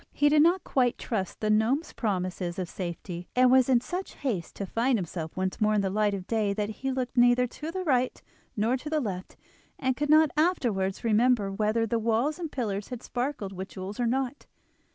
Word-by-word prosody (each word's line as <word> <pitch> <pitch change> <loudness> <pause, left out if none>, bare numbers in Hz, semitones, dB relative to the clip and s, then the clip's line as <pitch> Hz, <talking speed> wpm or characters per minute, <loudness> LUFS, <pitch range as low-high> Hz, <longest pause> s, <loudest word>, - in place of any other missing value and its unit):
He 290 - +3
did 300 0 +5
not 345 +4 +4
quite 250 -3 +1
trust 195 -6 -3
the 215 -1 +1
gnome's 235 +9 +1
promises 185 -4 -2
of 185 -2 -2
safety, 175 0 -6
and 250 0 +5
was 260 0 +5
in 245 -2 +4
such 360 +8 -5
haste 220 -12 -3
to 200 - -4
find 235 +5 +1
himself 170 -3 -5
once 185 +2 -2
more 215 0 +3
in 205 - +3
the 195 -1 -1
light 210 0 +1
of 185 -2 -6
day 215 -2 0
that 210 0 -2
he 265 +5 -3
looked 255 -1 -3
neither 245 0 +5
to 300 +6 -7
the 370 +2 -3
right 255 -6 +1 0.4
nor 225 +4 +2
the 305 +3 -2
left, 190 -8 -5 0.4
and 260 -1 0
could 295 +2 -2
not 310 0 +6
afterwards 235 - +1
remember 225 -2 +3
whether 215 +3 +1
the 230 +1 0
walls 235 +9 0
and 330 -3 -4
pillars 205 -6 -3
had 250 -2 -7
sparkled 245 -6 -3
with 190 +1 -6
jewels 195 +3 -7
or 240 - +1
not. 265 +3 -2
230 Hz, 205 wpm, -28 LUFS, 200-265 Hz, 0.4 s, not